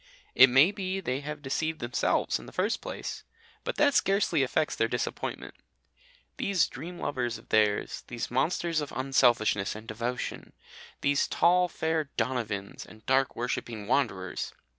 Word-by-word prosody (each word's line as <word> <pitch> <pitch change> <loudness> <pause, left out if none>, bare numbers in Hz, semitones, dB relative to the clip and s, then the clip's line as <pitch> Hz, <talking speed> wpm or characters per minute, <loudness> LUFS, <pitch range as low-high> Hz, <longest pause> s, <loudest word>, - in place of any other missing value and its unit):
It 130 +1 +8
may 135 +9 +6
be 195 -2 -3
they 135 -8 -2
have 150 +1 -7
deceived 155 +4 -1
themselves, 120 +1 0
in - - -12
the - - -10
first 205 +5 0
place, - - -6 0.4
but - - -3
that 290 -1 +4
scarcely 195 - +2
affects 150 +4 0
their 115 - +2
disappointment. 120 +1 -4 0.8
These 190 -6 +2
dream 170 +7 -8
lovers 120 -7 -2
of 115 - -18
theirs, 105 -1 +1
these 120 -1 -5
monsters 160 +5 +1
of 145 - -5
unselfishness 120 -7 +2
and 110 +1 -10
devotion, 120 +3 -4 0.5
these 140 0 +2
tall 180 +1 +4
fair 160 -2 -1
Donovans 115 -5 -2
and 110 0 -16
dark 135 0 +2
worshipping 115 -3 -3
Wanderers! 95 -7 -1
135 Hz, 145 wpm, -29 LUFS, 115-160 Hz, 0.8 s, It